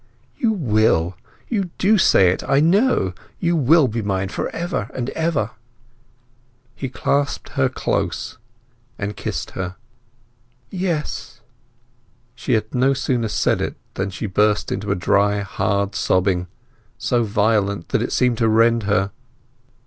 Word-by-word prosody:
"You 230 - +1
will—you 110 - 0
do 210 +2 +3
say 95 - +5
it, 90 - -2
I 135 - +3
know! 170 - +3 0.3
You 170 0 +1
will 155 0 +5
be 115 0 -2
mine 95 -2 -1
for - - -3
ever 165 - -3
and 125 0 -3
ever." 160 -10 -1 1.2
He 135 - -4
clasped 140 +2 -1
her - - +1
close - - -2 0.6
and 105 0 -4
kissed - - -4
her. 90 -1 -4 1.0
"Yes!" 180 -5 -3 0.9
She - - -2
had 110 -1 0
no 130 +2 +3
sooner 125 -3 0
said - - +1
it - - -2 0.2
than 95 +1 -2
she 95 - -5
burst 105 +1 +1
into 100 0 -2
a - - +2
dry 100 +3 +2
hard 100 0 -1
sobbing, 95 -2 +1 0.5
so 120 -1 +1
violent 100 -3 +1
that - - +1
it - - -2
seemed 125 -3 +2
to 115 -2 +3
rend 115 +1 +4
her. 100 -1 +2
110 Hz, 135 wpm, -21 LUFS, 100-140 Hz, 1.2 s, say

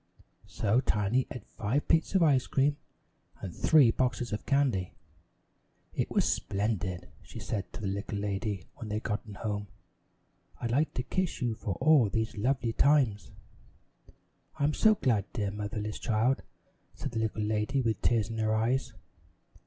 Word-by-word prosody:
So 110 +3 +1
Tiny 105 +3 +1
ate 120 -5 -8
five 120 +8 -2
plates 165 +4 +2
of 185 - +5
ice 140 -5 +3
cream 140 +2 +2 0.6
and 90 - -7
three 145 -8 +5
boxes 125 -2 -1
of 105 - -4
candy. 130 -11 +1 1.0
"It - - -1
was - - +2
splendid," 100 -3 -1
she - - -12
said 100 -4 -4
to - - -7
the 100 - -2
little 100 +1 -3
lady 100 -1 -2
when 115 -6 -7
they'd 105 +1 -2
gotten 105 -1 -4
home. 105 -1 -3 0.9
"I'd 115 - -2
like 145 +6 +1
to 125 - -1
kiss 185 +7 -1
you 120 -4 0
for 105 -3 -4
all 140 -6 +5
these 110 +2 -2
lovely 120 +1 0
times." 130 -8 +3 1.3
"I'm 145 +1 +1
so 215 +5 +5
glad, 110 - 0
dear 100 -4 -1
motherless 105 +1 -4
child," 120 +3 +1 0.5
said - - -5
the 115 - -2
little 110 -1 -1
lady 110 +5 0
with 115 -2 0
tears 115 -2 +2
in 115 - -4
her 110 0 +1
eyes. 120 +4 0
110 Hz, 155 wpm, -30 LUFS, 105-130 Hz, 1.3 s, of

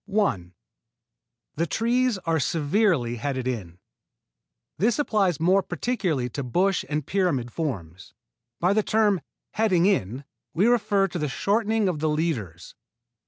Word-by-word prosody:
1. 190 - 0 1.0
The 170 +2 0
trees 235 - +1
are 165 -1 +1
severely 150 - +1
headed 130 +1 -3
in. 95 -9 -4 1.0
This 220 +5 +2
applies 205 - +1
more 185 +4 +4
particularly 180 - -2
to 140 - -5
bush 180 +10 +1
and 150 -2 -2
pyramid 145 -12 0
forms. 95 - -5 0.4
By 180 +3 +2
the 215 - +3
term 210 -4 +2 0.3
"heading 190 -6 +2
in" 135 - 0 0.3
we 185 +6 +3
refer 205 -5 +3
to 175 -1 -5
the 150 -2 -1
shortening 215 +5 +1
of 175 -5 -1
the 155 +1 0
leaders. 125 - -3
170 Hz, 130 wpm, -25 LUFS, 130-205 Hz, 1.0 s, more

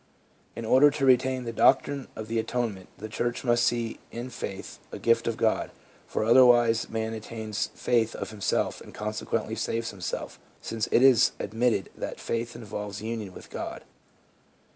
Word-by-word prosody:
In 115 - -5
order 130 +6 +6
to 140 -1 -1
retain 130 0 +3
the 115 -1 -5
doctrine 135 +3 +3
of 110 - -6
the 115 +1 0
Atonement, 110 -5 -3
the 110 - -6
church 120 +3 -2
must 120 -1 +3
see 120 -1 0
in 120 +2 -6
faith 100 -5 -6
a - - -5
gift 115 0 +2
of 115 -1 -1
God; 110 -1 +1 0.4
for - - -1
otherwise 120 -1 +5
man 110 0 -2
attains 110 -1 -4
faith 115 -2 +1
of - - -5
himself, 105 -2 -1
and - - -12
consequently 105 +1 -2
saves 115 +1 -2
himself, 95 -3 -5 0.2
since 110 -1 -3
it 120 - +5
is 130 -4 +6
admitted 110 -1 0
that - - -5
faith 115 0 -3
involves 105 -3 -6
union 110 -3 -4
with - - -13
God. - - -5
115 Hz, 165 wpm, -27 LUFS, 110-120 Hz, 0.4 s, order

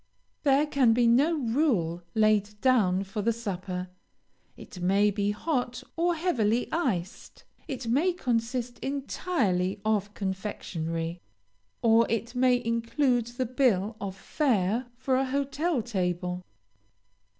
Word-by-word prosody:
There 280 0 +4
can 270 -6 +3
be 240 +1 +3
no 280 +8 +4
rule 225 - +1
laid 210 -1 +2
down 205 -7 +3
for 205 +2 -4
the 230 +3 +2
supper. 185 -5 -4 0.7
It 180 - -11
may 200 +3 +3
be 205 0 0
hot 245 +2 -2
or 345 +1 +1
heavily 245 - +1
iced. 205 - -3 0.2
It 265 -5 -5
may 290 +11 +3
consist 245 -5 -2
entirely 260 - -1
of 210 -1 0
confectionary, 170 -4 -4 0.6
or 230 0 +5
it 230 +1 -2
may 250 -1 +2
include 235 +1 +1
the 245 +2 -3
bill 225 -5 +1
of 195 -2 -4
fare 230 - 0
for 260 0 +1
a 265 - +1
hotel 280 +1 -1
table. 180 -4 -2
230 Hz, 120 wpm, -28 LUFS, 195-260 Hz, 0.7 s, or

